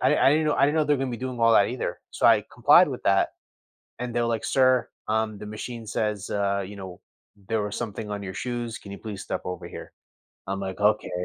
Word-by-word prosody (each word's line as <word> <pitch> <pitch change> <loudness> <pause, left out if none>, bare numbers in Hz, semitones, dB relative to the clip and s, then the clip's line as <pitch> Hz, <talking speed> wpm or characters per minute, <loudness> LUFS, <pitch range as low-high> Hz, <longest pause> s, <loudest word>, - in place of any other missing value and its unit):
I - - +4
I - - +7
didn't 155 +2 +3
know 150 - +2
I 140 - +4
didn't 145 - +1
know 155 - +3
they're 145 -1 +2
gonna 135 -1 -2
be 120 - -3
doing 130 +1 -5
all 115 0 +5
that 100 -2 +5
either. 125 +2 -3
So - - +1
I - - +5
complied - - +6
with - - -5
that, 100 0 +3 0.7
and 125 -1 -4
they're, 120 - +1
like, 115 -1 -1
"Sir, 130 -2 +3 0.2
um, 110 -1 0
the 105 - -8
machine 115 +2 -7
says, 105 -1 -2
uh, 100 -1 0
you 100 +2 -9
know, 95 -2 -9 0.5
there 110 -2 +1
was 105 0 -4
something 105 -1 -5
on 100 0 -4
your 95 -1 -6
shoes. 120 0 -4
Can 100 - -11
you 100 - -7
please 105 -3 -7
step - - -4
over 90 -1 -5
here?" - - -9 0.5
I'm, 95 0 -3
like, 95 0 -5
"Okay, 105 +1 +2
110 Hz, 240 wpm, -26 LUFS, 100-120 Hz, 0.7 s, I